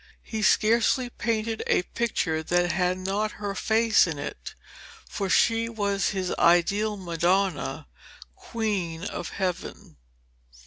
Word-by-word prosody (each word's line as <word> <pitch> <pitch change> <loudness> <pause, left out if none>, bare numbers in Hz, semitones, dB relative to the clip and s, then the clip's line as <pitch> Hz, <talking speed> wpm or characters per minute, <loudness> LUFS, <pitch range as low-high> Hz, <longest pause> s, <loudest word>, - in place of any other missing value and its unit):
He 220 -1 -5
scarcely 235 +4 +3
painted 225 -1 -2
a - - +2
picture 180 -8 -1
that 175 +2 +1
had 180 +1 0
not 200 +3 -2
her 205 -1 -4
face 220 +1 +3
in 160 -4 -4
it, 145 - -7 0.5
for 195 -2 -3
she 230 +3 +3
was 200 -3 0
his 190 -2 -2
ideal 200 +5 +3
Madonna, 185 +2 0 0.5
Queen 210 - -3
of 175 - -5
Heaven. 180 - -5
200 Hz, 120 wpm, -26 LUFS, 180-220 Hz, 0.5 s, scarcely